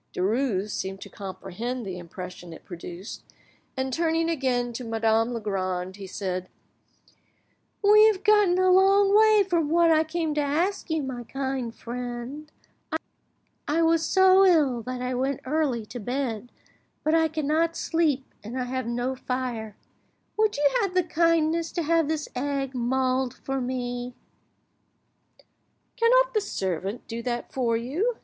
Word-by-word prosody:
Derues 210 0 0
seemed 190 0 -4
to - - -9
comprehend 210 +5 -6
the 185 -2 -5
impression 180 0 -9
it - - -13
produced, 175 +3 -8 0.6
and 260 0 -2
tuning 330 +1 +1
again 250 -5 0
to 250 - -5
Madame 225 0 +1
Legrand, 190 -4 -3
he 195 -1 -8
said— 185 -1 -4 1.3
"We 425 +1 +7
have 405 -3 +1
got 420 -2 +5
a 370 0 +4
long 390 +2 +5
way 430 -1 +6
from 335 -5 +1
what 335 +1 +4
I 315 0 +4
came 320 -1 -2
to 295 - +1
ask 335 +9 -1
you, 320 -2 0
my 255 -2 -5
kind 265 -2 -3
friend. 245 +5 -6 1.2
I 325 +3 +2
was 325 0 +3
so 380 +3 +5
ill 300 -10 +4
that 255 0 -4
I 250 0 -2
went 265 +2 -1
early 265 -5 0
to 245 - -8
bed, 245 -1 -3 0.5
but 310 - +1
I 325 0 +4
cannot 315 +2 0
sleep, 305 -5 +1 0.2
and 235 +5 -5
I - - 0
have 255 -1 -3
no 245 +2 -1
fire. 250 -5 -4 0.6
Would 430 -4 +1
you 290 0 +4
have 390 -3 -2
the 365 - +4
kindness 330 -1 +1
to 340 - -1
have 330 0 +2
this 310 -1 -2
egg 275 0 -2
mulled 255 +1 0
for 270 0 -3
me?" 245 -1 -4 1.8
"Cannot - - +4
your 430 - +2
servant 195 - -3
do 230 0 -5
that 240 0 -4
for 235 -3 +1
you?" 335 - -1
265 Hz, 150 wpm, -26 LUFS, 235-330 Hz, 1.8 s, We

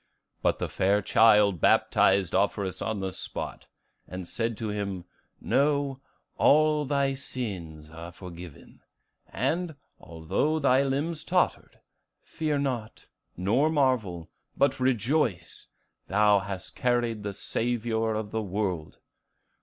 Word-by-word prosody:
But - - +2
the - - -2
fair 100 +2 +1
child 105 -4 +4
baptized 95 -3 +3
Offerus 100 -1 0
on 110 -3 -2
the 95 -1 -3
spot, - - -6 0.4
and 90 -1 -7
said 115 +2 -2
to 110 -2 -3
him, 100 -3 -4 0.3
'Know, 140 -1 +1 0.4
all 150 0 +4
thy 140 -1 +1
sins 95 - -6
are 85 +1 -9
forgiven; 85 -4 -11 0.5
and, 170 -1 -1 0.2
although 85 - -1
thy 135 -3 +3
limbs 145 +4 -1
tottered, - - -1 0.4
fear 155 -2 -2
not, 125 -6 -3 0.3
nor 115 - +2
marvel, 120 - 0 0.3
but 140 -2 +2
rejoice; 125 - 0 0.4
thou 105 0 +4
hast 95 -1 -7
carried 120 -3 0
the 100 -1 -5
Saviour 115 -1 -1
of 105 -1 -4
the 110 - -1
world! 95 -5 -3
110 Hz, 115 wpm, -27 LUFS, 95-135 Hz, 0.5 s, child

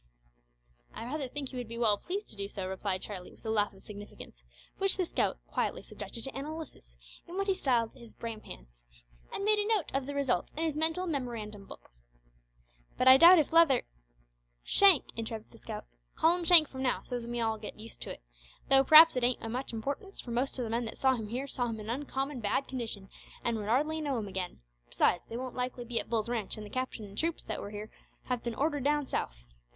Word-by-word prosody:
"I - - -6
rather 280 +2 -3
think 275 +1 -5
he 260 - -8
would 245 -2 -4
be 230 +1 -6
well 225 -3 +4
pleased 390 - -5
to - - -9
do 200 -1 -4
so," 195 -2 -5
replied 190 0 -2
Charlie, 185 -4 -7
with - - -21
a 220 - -1
laugh 210 -2 +2
of 195 -1 -17
significance, 205 - -11 0.4
which 390 0 +2
the 370 - +1
scout - - 0
quietly - - -2
subjected 230 - -8
to 270 - +1
analysis 275 - -8 0.3
in 350 +2 -7
what 395 - 0
he 390 - +2
styled 245 -10 +1
his 235 -4 -15
brain 230 -2 -6
pan, - - -10 0.7
and 395 - -4
made 425 0 +4
a 415 - 0
note 435 -6 +1
of 270 0 -1
the 285 - -5
result 275 -3 0
in 320 - -1
his 315 -3 0
mental 320 +4 +2
memorandum 230 - -4
book! - - -13 1.1
"But 255 - +2
I 260 0 +11
doubt 345 +5 +9
if 310 -1 +1
Leather 325 -7 +6 0.4
" - - -45
"Shank," 390 -8 +7
interrupted 225 -1 -6
the - - -16
scout. - - -7 0.3
"Call 330 +2 +4
him 355 -1 -4
Shank 330 -3 +9
from 260 -1 -7
now, 255 -1 0
so's 245 -2 -5
we 240 - -5
may 240 - -1
all 220 -1 0
git 210 - -8
used 220 +1 -10
to - - -6
it; - - -9 0.5
tho' 270 0 +8
p'r'aps 315 +2 +9
it 250 - 0
ain't 245 +1 +1
o' 225 - -4
much 255 +4 -4
importance, 280 - -5
for 240 - -7
most 255 +3 -1
o' - - 0
the 225 - -4
men 235 +1 0
that 225 - -7
saw 265 -1 +3
him 225 -4 -4
here 250 +5 -3
saw 250 -3 -2
him 225 -2 -4
in 215 +2 -5
uncommon 270 +1 -3
bad 230 +5 0
condition 225 -6 -4 0.4
an' 235 - +1
would 210 -2 -4
hardly 305 +6 +1
know 285 -4 -1
him 215 -3 -3
again, 185 - -5 0.3
besides, 170 - +2
they 230 - -4
won't 255 0 -5
likely 250 -1 -3
be 235 -1 -1
at - - -6
Bull's 225 -2 0
ranch, 230 -5 -3
an' 215 - -7
the 205 - -10
captain 255 -4 -3
an' 200 0 -12
troops 330 +7 -1
that - - -4
were 200 - -6
here 210 +1 -7 0.3
have 250 -2 -2
been 235 -2 -3
ordered 290 0 0
down 295 0 +2
south. - - -4
245 Hz, 235 wpm, -31 LUFS, 215-290 Hz, 1.1 s, I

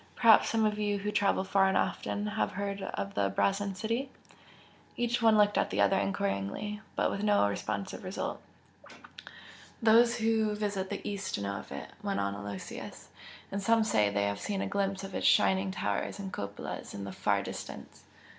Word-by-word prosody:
Perhaps 230 -3 +6
some 225 -1 +2
of 210 0 0
you 205 -1 +1
who 205 +1 -3
travel 200 -2 +2
far 195 0 +3
and 190 - +2
often, 205 - -1
have 210 - -1
heard 200 +1 -3
of 100 - -4
the 100 -1 +1
Brazen 195 - 0
City?" 230 +7 -2 0.9
Each 240 0 0
one 225 -1 +5
looked 205 0 +4
at - - +1
the 100 - -2
other 100 0 +4
enquiringly, 100 - -2
but - - +1
with 200 - -3
no 205 - +4
responsive 100 0 -4
result. 185 +1 -4 1.4
"Those 235 +1 +5
who 220 -2 +1
visit 200 -2 -2
the 205 - -5
East 195 - -3
know 100 -1 -3
of - - -10
it" - - -7
went - - -1
on 100 0 0
Aloysius 100 -1 -7 0.4
"And 200 +1 -2
some 225 +2 +4
say 105 - +3
they 100 0 0
have 100 0 -2
seen 195 - -2
a - - -2
glimpse 195 -1 -1
of 195 -1 -7
its - - +1
shining 190 0 +4
towers 190 - -2
and 195 -2 -6
cupolas 100 0 -6
in 100 - -5
the 100 - -5
far - - +1
distance. - - -8
195 Hz, 185 wpm, -30 LUFS, -, 1.4 s, Perhaps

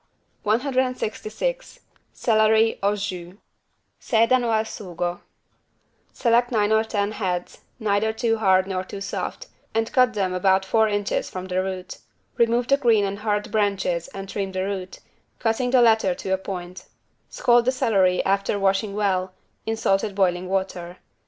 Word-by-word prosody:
166 255 - -2 0.3
CELERY 220 0 +3
AU 200 +1 +2
JUS 185 -3 -5 0.7
(Sedano 235 +1 +2
al 220 -1 +2
sugo) 175 -5 -5 0.9
Select 240 +1 +2
nine 210 -2 +2
or 220 0 +4
ten 205 -2 -1
heads, 180 -4 -3 0.2
neither 215 -1 +1
too 225 0 0
hard 190 -3 +4
nor 185 -1 -3
too 195 - -8
soft, 200 - -4 0.3
and 225 0 0
cut 250 -5 +4
them 190 -3 0
about 190 +1 +2
four 220 +3 +3
inches 205 -1 -1
from 185 0 -6
the 185 0 -1
root. 185 -1 -5 0.4
Remove 235 +1 +2
the 275 - +4
green 230 -7 +3
and 200 +1 -4
hard 210 -1 -1
branches 200 -5 0
and 195 0 -8
trim 195 -1 -4
the 185 0 -1
root, 190 -2 -5 0.4
cutting 235 +2 0
the 250 -1 +5
latter 220 -5 +3
to 190 - -3
a - - +2
point. 185 -1 -7 0.4
Scald 240 -1 +3
the 255 - +3
celery, 195 -8 +2
after 195 +1 +1
washing 195 +1 0
well, 190 -3 0 0.3
in 225 0 -1
salted 195 -1 0
boiling 185 -2 +1
water. 185 -2 -3
205 Hz, 150 wpm, -23 LUFS, 190-225 Hz, 0.9 s, the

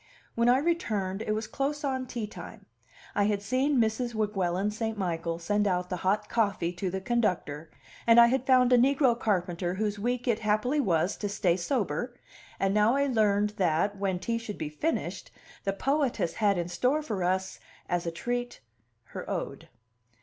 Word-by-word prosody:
When 235 +1 +2
I 250 - +6
returned, 220 - -1
it 215 - -1
was 215 +1 -2
close 285 +6 -2
on 260 -2 -1
tea 235 -3 -4
time; 210 - -10 0.5
I 205 - +2
had 205 -1 0
seen 260 +6 +1
Mrs. 230 +1 0
Weguelin 200 -2 0
St. 220 0 -3
Michael 170 -3 -2
send 205 +4 0
out 180 -1 -1
the 180 - -1
hot 200 +4 0
coffee 200 -6 0
to 180 +1 -3
the 190 +2 -3
conductor, 180 -8 -1 0.4
and 230 0 +8
I 235 - +10
had 260 +2 0
found 255 -1 +5
a 245 - +6
negro 270 0 +4
carpenter 180 -4 -1
whose 210 0 -2
week 245 +3 -2
it 230 -2 +2
happily 215 +7 +1
was 180 - +1
to 205 - -3
stay 195 -4 +1
sober; 215 - -2 0.4
and 195 0 +1
now 210 +4 +4
I 280 0 +2
learned 210 -5 +2
that, 180 +3 +1
when 195 -2 -1
tea 230 +6 -2
should 225 -3 -7
be 155 - -4
finished, 300 - -3 0.4
the 195 - +2
poetess 260 - 0
had 205 -3 +2
in 175 -1 -1
store 255 +12 0
for 210 -10 -3
us, 185 +1 -1 0.3
as 175 -1 -1
a - - 0
treat, 245 +7 -3 0.5
her - - -6
ode. - - -4
210 Hz, 180 wpm, -28 LUFS, 185-245 Hz, 0.5 s, I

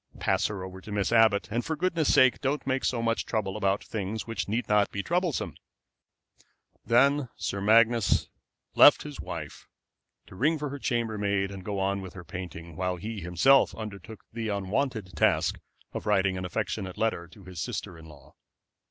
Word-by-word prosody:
"Pass - - +1
her 100 -3 -5
over 95 0 -8
to 105 - -10
Miss 100 0 0
Abbott. 110 -3 +4
And 120 +2 -1
for 160 - -2
goodness' 170 -2 +1
sake 130 -1 +5
don't 140 +2 -1
make 130 0 0
so 120 -2 0
much 115 0 0
trouble 105 -3 -2
about 100 -1 0
things 110 0 -4
which 115 -3 -4
need 115 +4 -1
not 105 -1 +3
be 100 - -4
troublesome." 175 -4 -1 1.3
Then 140 +2 +3
Sir 100 - -3
Magnus 115 +1 +4 0.5
left - - +7
his - - -8
wife - - -7 0.6
to - - -15
ring 150 - +1
for 150 -1 -4
her 140 +1 -6
chambermaid 105 -5 -1
and 95 -2 -8
go 100 +1 -3
on 100 +1 0
with 95 -1 -9
her 95 - -8
painting, 85 -2 -8
while 90 +1 -1
he 105 +3 -6
himself 90 +11 +4
undertook 110 -1 -8
the 115 -2 -3
unwonted 100 +1 -2
task - - +2 0.3
of - - -5
writing 95 -2 +2
an 90 0 -4
affectionate 90 +1 -3
letter 110 -6 -1
to 100 +3 -16
his 90 -2 -7
sister 90 - -4
in 80 -1 -13
law. 75 -1 -16
105 Hz, 180 wpm, -28 LUFS, 95-120 Hz, 1.3 s, left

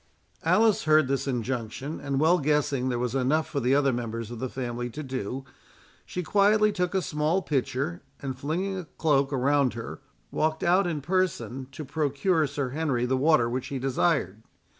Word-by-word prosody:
Alice 220 -4 +3
heard 155 -2 +5
this 135 0 -1
injunction, 125 +3 -3
and 140 -1 -1
well 165 +4 +4
guessing 140 -3 +1
there 125 - -1
was 120 0 -2
enough 135 +4 +1
for 140 - -2
the 130 +1 +2
other 140 -2 +3
members 115 -1 -4
of 120 - -6
the 130 - -3
family 120 -1 -4
to 150 +6 -7
do, 130 0 -4 0.6
she 180 - -4
quietly 210 +4 +4
took 180 -2 -1
a 190 - +1
small 155 +6 0
pitcher, 140 +4 -1 0.2
and 135 -2 -4
flinging 180 +8 -2
a 180 - -7
cloak 145 -4 +1
around 140 -1 +2
her, 115 - -7 0.3
walked 155 0 0
out 180 +2 +3
in 155 -4 -2
person 135 - -1
to 150 +3 -7
procure 150 +3 +1
Sir 140 -1 -3
Henry 135 -4 0
the 130 +1 +1
water 145 -2 +4
which 125 +2 -3
he 140 - -4
desired. 130 - 0
140 Hz, 180 wpm, -27 LUFS, 130-160 Hz, 0.6 s, heard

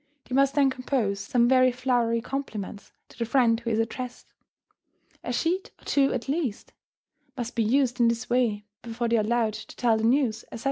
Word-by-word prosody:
They - - -7
must 275 +1 +3
then 275 -2 +4
compose 250 -6 -1
some 235 +4 +2
very 255 0 +5
flowery 240 -2 0
compliments 225 -6 -6 0.2
to - - -18
the - - +1
friend 230 -2 +3
who 235 -1 -4
is 220 - +1
addressed; 245 +2 -4 0.9
a - - -3
sheet 360 +3 -1
or - - -22
two, 275 -1 +2
at 250 0 -3
least, 275 -7 -3 0.6
must 240 -1 -4
be 235 - +1
used 250 +2 +1
in 235 - +5
this 230 -1 -1
way 235 -4 +1 0.2
before 235 +1 -3
they 230 0 +2
are - - +3
allowed 225 0 +1
to 215 +1 -9
tell 235 -3 +2
the 220 - -3
news, 235 -2 +2
etc. 230 - -7
240 Hz, 195 wpm, -26 LUFS, 225-260 Hz, 0.9 s, very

